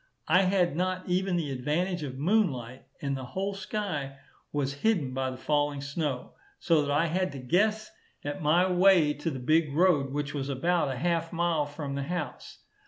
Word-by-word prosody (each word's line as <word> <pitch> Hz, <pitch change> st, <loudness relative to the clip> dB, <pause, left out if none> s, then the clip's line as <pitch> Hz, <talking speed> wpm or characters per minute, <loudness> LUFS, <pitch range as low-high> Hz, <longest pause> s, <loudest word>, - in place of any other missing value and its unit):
I 180 Hz, -, +5 dB
had 185 Hz, -4 st, +2 dB
not 185 Hz, +1 st, -1 dB
even 185 Hz, +1 st, +1 dB
the 160 Hz, -5 st, -1 dB
advantage 155 Hz, +8 st, -1 dB
of 130 Hz, -3 st, -5 dB
moonlight, 135 Hz, -, 0 dB, 0.2 s
and 140 Hz, -1 st, 0 dB
the 130 Hz, -, -5 dB
whole 195 Hz, +10 st, -3 dB
sky 185 Hz, -8 st, -4 dB, 0.3 s
was 140 Hz, -1 st, -2 dB
hid 175 Hz, -13 st, +1 dB
by 130 Hz, 0 st, -1 dB
the 130 Hz, -, -7 dB
falling 145 Hz, +1 st, 0 dB
snow, 140 Hz, -2 st, -3 dB, 0.3 s
so 165 Hz, -3 st, +3 dB
that 145 Hz, -, -2 dB
I 145 Hz, +3 st, +2 dB
had 185 Hz, +3 st, 0 dB
to -, -, -6 dB
guess 210 Hz, -, +1 dB, 0.3 s
at 145 Hz, 0 st, -4 dB
my 165 Hz, +5 st, +4 dB
way 180 Hz, -4 st, +5 dB
to 150 Hz, +3 st, -3 dB
the 135 Hz, -, -4 dB
big 155 Hz, +4 st, +2 dB
road, 155 Hz, -6 st, +3 dB
which 145 Hz, 0 st, -3 dB
was 140 Hz, -1 st, -3 dB
about 160 Hz, +3 st, +1 dB
a 130 Hz, -, -3 dB
half 165 Hz, +3 st, 0 dB
mile 165 Hz, -3 st, +1 dB
from 145 Hz, -1 st, -5 dB
the 140 Hz, -, -2 dB
house. 165 Hz, +2 st, -5 dB
155 Hz, 185 wpm, -28 LUFS, 140-180 Hz, 0.3 s, I